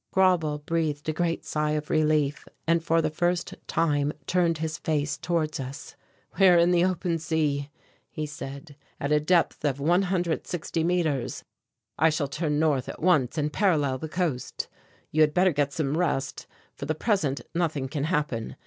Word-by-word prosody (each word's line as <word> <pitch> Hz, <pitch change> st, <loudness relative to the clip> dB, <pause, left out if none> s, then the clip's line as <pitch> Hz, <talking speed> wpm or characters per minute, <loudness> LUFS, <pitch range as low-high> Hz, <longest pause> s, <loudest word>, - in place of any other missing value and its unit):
Grauble 180 Hz, -6 st, +3 dB
breathed 150 Hz, -1 st, -2 dB
a -, -, 0 dB
great 165 Hz, 0 st, -1 dB
sigh 150 Hz, 0 st, 0 dB
of 150 Hz, 0 st, -3 dB
relief 155 Hz, -2 st, +1 dB, 0.2 s
and 165 Hz, 0 st, +2 dB
for 165 Hz, 0 st, +2 dB
the 155 Hz, -, 0 dB
first 175 Hz, +2 st, 0 dB
time 145 Hz, -3 st, +1 dB
turned 170 Hz, -1 st, +2 dB
his 160 Hz, +1 st, -3 dB
face 150 Hz, -2 st, 0 dB
towards 160 Hz, -3 st, -1 dB
us. 135 Hz, +2 st, -7 dB, 0.4 s
"We 195 Hz, -, +7 dB
are 175 Hz, -1 st, +7 dB
in 170 Hz, +1 st, +4 dB
the 175 Hz, -1 st, +4 dB
open 180 Hz, -2 st, 0 dB
sea," 150 Hz, -3 st, 0 dB, 0.4 s
he 155 Hz, -, -4 dB
said, 145 Hz, +1 st, -8 dB, 0.2 s
"at 140 Hz, -, -2 dB
a 150 Hz, -, +5 dB
depth 170 Hz, +3 st, +2 dB
of 140 Hz, -2 st, 0 dB
160 175 Hz, 0 st, 0 dB
metres. 165 Hz, -7 st, 0 dB, 0.6 s
I 160 Hz, +2 st, +5 dB
shall 150 Hz, -2 st, -1 dB
turn 150 Hz, +1 st, -1 dB
north 150 Hz, -4 st, +1 dB
at -, -, -7 dB
once 155 Hz, -6 st, +3 dB
and 150 Hz, -1 st, -1 dB
parallel 150 Hz, -10 st, +2 dB
the 160 Hz, -, -5 dB
coast. 160 Hz, -7 st, -2 dB, 0.4 s
You 155 Hz, -, +2 dB
had 150 Hz, -1 st, +4 dB
better 185 Hz, +1 st, +4 dB
get 145 Hz, 0 st, +1 dB
some 145 Hz, -1 st, -1 dB
rest; 145 Hz, -6 st, -1 dB, 0.3 s
for 140 Hz, -, -7 dB
the 155 Hz, -, 0 dB
present 155 Hz, -, 0 dB
nothing 160 Hz, -6 st, -1 dB
can 145 Hz, +1 st, -2 dB
happen. 150 Hz, -9 st, -1 dB
155 Hz, 170 wpm, -26 LUFS, 145-170 Hz, 0.6 s, We